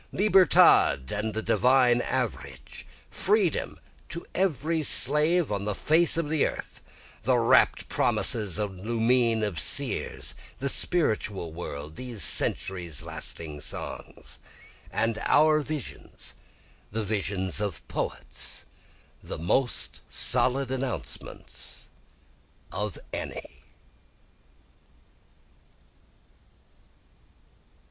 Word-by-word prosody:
Libertad 185 - +5
and 105 +1 -2
the 110 - -2
divine 125 -1 +4
average, 115 - -4 0.2
freedom - - 0 0.3
to 170 - -5
every 165 -3 0
slave 150 +3 +2
on 100 -1 -2
the 105 -1 -1
face 160 - +3
of 165 -2 0
the 155 -1 +1
earth, - - -7 0.4
The - - +2
rapt - - +3
promises 105 -6 +2
and 100 -4 -3
lumine 115 0 +2
of 100 -7 -2
seers, - - 0 0.2
the 140 - -1
spiritual 105 - 0
world, 75 -2 -7
these 120 -7 -2
centuries 85 -6 +1
lasting 75 -3 -6
songs, - - -7 0.5
And 110 0 0
our 155 +1 +5
visions, 150 -2 -6 0.6
the 110 +1 -2
visions 100 -2 -2
of 100 -6 -4
poets, - - -5 0.6
the - - -6
most 120 - 0
solid 130 0 +1
announcements 125 - -5 0.8
of 105 0 -3 0.2
any. - - -6
115 Hz, 90 wpm, -27 LUFS, 95-140 Hz, 0.8 s, Libertad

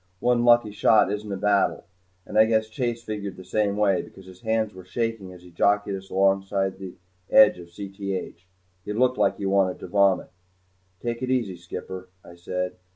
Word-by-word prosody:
One 120 +2 +2
lucky 120 -3 +5
shot 105 -1 +4
isn't 105 0 -4
a 100 - -2
battle, 100 +1 +1 0.4
and - - -9
I 110 0 +7
guess 110 -1 +1
Chase 120 0 -3
figured 100 -4 -5
the 95 - -10
same 100 +2 0
way 100 -3 +2
because 95 - -14
his 95 0 -14
hands 110 -1 0
were 95 0 -11
shaking 115 0 -3
as 90 -1 -14
he 90 - -15
jockeyed 100 +3 +1
us 95 0 -7
along 95 0 +2
on 95 -1 0
the 95 -2 -8 0.3
edge 105 -4 +6
of 85 - -11
Cth. 95 -1 -6 0.4
He 105 - -4
looked 125 +3 +1
like - - +2
he 100 - -4
wanted 95 -1 +2
to - - -8
vomit. 100 0 +2 0.7
"Take 120 0 -3
it 130 - -2
easy, 120 -8 0
skipper," 90 +1 -8 0.2
I 85 - -12
said. 90 +1 -4
100 Hz, 195 wpm, -25 LUFS, 95-110 Hz, 0.7 s, I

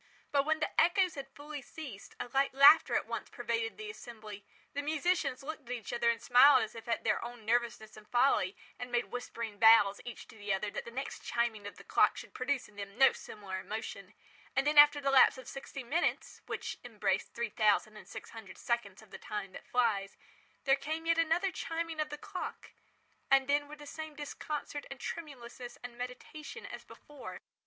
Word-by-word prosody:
But 280 -1 +3
when 315 0 +2
the - - +2
echoes 355 +1 +3
had 275 -2 -7
fully 295 0 -7
ceased, 255 -6 -9
a - - -3
light 275 0 +1
laughter 280 +4 +8
at - - +1
once - - -5
pervaded 455 0 -2
the 430 0 -6
assembly; 215 - -10 0.3
the 285 - -1
musicians 300 -2 0
looked 300 -3 -7
at 250 - -1
each 230 - -7
other 235 0 +2
and 235 - +1
smiled 250 +3 +7
as 220 - -6
if 230 +1 -10
at 230 - -1
their - - +1
own 240 -2 -8
nervousness 235 -1 0
and 215 0 -14
folly, 240 -6 +3 0.2
and 245 0 -6
made 240 0 0
whispering 230 -3 -5
vows, 220 -3 +7
each 240 - -8
to - - -13
the 205 -1 -4
other, 205 +2 -3
that - - -5
the - - -7
next 265 +4 -5
chiming 230 -4 -1
of 205 - -9
the - - -12
clock - - +3
should - - -9
produce 260 +1 -1
in 210 - -21
them 200 +1 -7
no 270 +1 +7
similar 195 -3 -7
emotion; 205 -1 -6 0.4
and 275 - +2
then, 295 0 +6
after 290 0 +8
the 275 -1 +1
lapse 265 -1 +7
of 260 - -10
sixty 275 0 -7
minutes, 315 +8 -1
(which - - -4
embrace - - 0
three 235 -2 -4
thousand 215 0 +2
and 210 - -12
six - - -9
hundred 220 -5 -10
seconds 220 -4 -2
of 220 - -20
the - - -9
Time 210 -3 -5
that - - -11
flies,) 215 -5 +1 0.5
there 270 -1 +5
came 310 +4 -4
yet 330 0 +3
another 335 +4 +2
chiming 330 -1 -4
of 305 - 0
the 295 - -5
clock, 390 +2 -6 0.6
and 270 -1 +5
then 290 0 +2
were 300 - -9
the 295 0 -12
same 315 +1 -7
disconcert 290 0 -5
and 270 - -8
tremulousness 245 -6 -7
and 245 -1 -7
meditation 250 - -7
as - - -8
before. 295 -2 -10
255 Hz, 205 wpm, -32 LUFS, 225-295 Hz, 0.6 s, laughter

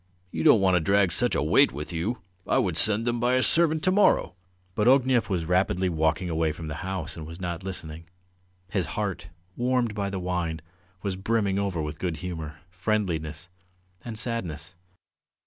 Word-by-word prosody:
"You 80 - -3
don't 105 - +6
want 95 -1 +3
to 90 - +4
drag 100 +3 +3
such - - +2
a - - +1
weight - - +4
with 75 +6 -7
you. 95 +9 -3 0.2
I - - +2
would - - +1
send 110 +1 +2
them 120 0 0
by 120 +2 +2
a 130 - +3
servant 160 -2 +4
to 185 - +3
morrow!" 200 - +3 0.4
But 105 +4 +1
Ognev 130 -3 +4
was 90 -4 -1
rapidly 90 +1 +1
walking 80 +2 0
away 80 -2 0
from 80 0 -8
the 75 - -4
house 95 -4 -4
and 80 -2 -8
was 80 +2 -9
not 85 -2 -4
listening. 85 -4 -6 0.7
His 95 -7 0
heart, 100 -4 -2 0.3
warmed 125 -2 0
by 100 -1 -2
the 95 - -4
wine, 90 -3 -2 0.4
was 100 -2 -1
brimming 100 0 0
over 95 -5 -1
with 75 +1 -6
good 85 -2 -2
humour, 80 -3 -6
friendliness, 90 -5 -2 0.6
and 115 -2 -6
sadness. 90 - -2
95 Hz, 180 wpm, -26 LUFS, 80-110 Hz, 0.7 s, don't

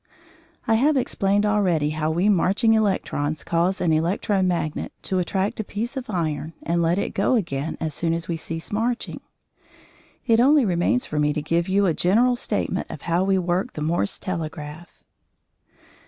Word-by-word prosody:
I 225 - +2
have 295 +1 +3
explained 205 -4 +1
already 180 -8 +2
how 155 0 -1
we 175 +5 +1
marching 205 +3 +3
electrons 155 -8 0
cause 170 +3 0
an 170 - +1
electro 190 +5 +1
magnet 175 -4 -1
to 185 - -1
attract 190 +4 -1
a - - 0
piece 230 +6 -4
of 260 -3 -5
iron 160 -4 -2
and 170 +1 0
let 170 +2 +2
it 200 - -2
go 200 +6 +2
again 160 - -2
as 160 -2 -3
soon 165 +2 -1
as 165 0 -5
we 170 - -1
cease 165 0 -5
marching. 235 +3 -2 1.0
It 230 -3 +4
only 280 +2 +5
remains 185 +7 +1
for 150 - -3
me 150 0 +2
to 150 - -2
give 170 +3 0
you 200 +1 +3
a 175 - +2
general 230 +10 +3
statement 240 - -2
of - - -8
how 170 +2 +1
we 190 0 +2
work 185 +6 -1
the 150 - -6
Morse 170 +5 0
telegraph. 160 -3 -6
180 Hz, 175 wpm, -23 LUFS, 165-210 Hz, 1.0 s, only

